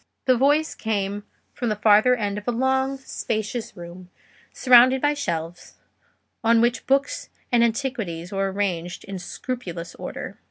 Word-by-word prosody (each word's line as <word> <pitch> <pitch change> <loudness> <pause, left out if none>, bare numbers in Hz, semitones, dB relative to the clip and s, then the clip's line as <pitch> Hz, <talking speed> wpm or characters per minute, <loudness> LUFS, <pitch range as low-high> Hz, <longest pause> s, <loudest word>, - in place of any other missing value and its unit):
The 255 - +5
voice 290 +5 +2
came 205 -2 -3 0.3
from 240 - -2
the 215 - 0
farther 215 +4 +5
end 205 -3 -2
of 205 - -17
a - - +2
long, 265 +2 0
spacious 225 -4 -4
room, 175 +1 -10 0.4
surrounded 255 +1 +5
with 290 0 +3
shelves, 170 - -4 0.7
on 230 0 +4
which 240 +1 +1
books 275 +1 0 0.2
and 240 -1 +4
antiquities 225 -8 -2
were 195 -1 -1
arranged 180 -3 -3
in 195 -1 -6
scrupulous 180 -4 -6
order. - - -7
225 Hz, 145 wpm, -24 LUFS, 195-255 Hz, 0.7 s, The